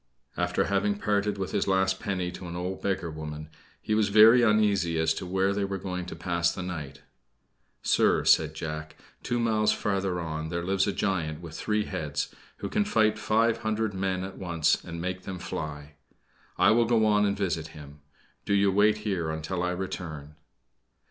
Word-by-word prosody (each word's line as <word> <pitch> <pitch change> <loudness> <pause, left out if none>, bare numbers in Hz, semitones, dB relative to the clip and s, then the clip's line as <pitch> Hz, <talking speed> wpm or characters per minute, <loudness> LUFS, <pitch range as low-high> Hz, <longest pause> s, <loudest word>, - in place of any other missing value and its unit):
After - - 0
having 100 +1 0
parted 105 0 0
with 95 -1 -3
his - - 0
last 95 0 +2
penny 90 -3 -2
to 90 0 -8
an 85 - -6
old 90 +2 -4
beggar 95 -4 -1
woman, 75 0 -7 0.3
he 110 - -1
was 105 -1 +2
very 110 +4 +8
uneasy 105 -6 +3
as 80 0 +2
to 90 - -6
where 95 +2 +1
they 100 0 -1
were 100 0 -2
to 90 -1 -5
pass 85 -1 0
the 95 - -5
night. 75 -7 -6 0.8
"Sir," - - +3
said - - +4
Jack, 75 0 -5 0.3
"two 120 - -1
miles 110 -2 +2
farther 95 -3 -1
on 80 -1 -4
there 85 +1 -3
lives 95 +2 +1
a - - +2
giant 80 -7 -1
with 85 -2 -9
three 105 -1 -1
heads, 75 -6 -3 0.2
who - - -4
can 210 - +1
fight 110 - +2
five 115 +1 +2
hundred 110 -1 -1
men 95 -1 -1
at 95 - -7
once 85 -4 +1
and 85 0 -7
make 95 +2 -3
them 95 0 -6
fly. 75 -3 -6 0.6
I - - +5
will 115 +1 +4
go 115 -1 +3
on 105 -1 +3
and 100 -1 +1
visit 85 -5 -1
him 75 0 -12 0.4
do 100 - +1
you 100 0 +4
wait 105 +2 +4
here 90 -6 -1
until 80 +3 -3
I 90 - 0
return." 90 -5 -5
95 Hz, 185 wpm, -27 LUFS, 85-105 Hz, 0.8 s, very